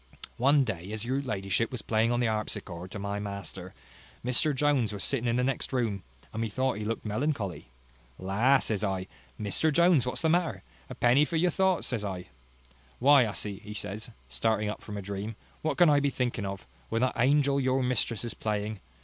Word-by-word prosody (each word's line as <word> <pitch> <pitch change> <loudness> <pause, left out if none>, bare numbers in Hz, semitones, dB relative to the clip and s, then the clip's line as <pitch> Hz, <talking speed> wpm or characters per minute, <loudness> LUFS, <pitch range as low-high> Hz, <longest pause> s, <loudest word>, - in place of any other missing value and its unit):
One 140 +3 +5
day, 95 -5 -4
as 110 +1 -4
your 130 +3 0
ladyship 105 -3 -1
was 125 - -5
playing 110 +1 +2
on 120 - +1
the 120 - +2
harpsichord 95 -5 -3
to 100 - -7
my 100 +1 -3
master, 100 -2 -6 0.5
Mr 125 +5 +3
Jones 135 -5 +2
was 100 -2 -2
sitting 125 -3 0
in 115 - +2
the 125 - +2
next 130 0 -1
room, 115 -7 0 0.3
and 110 - -3
methought 130 +3 0
he - - -3
looked 115 +2 -3
melancholy. 105 - -2 0.5
La! 105 +9 +3
says 110 -5 -1
I, 95 -2 -1 0.3
Mr 110 +9 +1
Jones, 170 -5 +4
what's 125 - -2
the - - +4
matter? 170 +1 +1 0.3
a - - -6
penny 125 +4 +4
for 165 - -2
your 175 +2 +3
thoughts, 190 0 +2
says 115 -5 -2
I. 95 -2 -5 0.7
Why, 135 0 +6
hussy, 100 0 -4
says 105 +1 -4
he, - - -14 0.2
starting 105 - 0
up 105 - -5
from 105 -1 -7
a 100 - -5
dream, 100 +3 -4 0.3
what 155 -3 -1
can 175 - +7
I 145 -1 +5
be 145 0 +2
thinking 120 -6 -2
of, 95 0 -6 0.2
when 115 +2 +1
that 130 - +2
angel 140 +2 +3
your 130 0 +1
mistress 120 -3 0
is 120 - -4
playing? 105 -1 -2
115 Hz, 200 wpm, -29 LUFS, 100-135 Hz, 0.7 s, can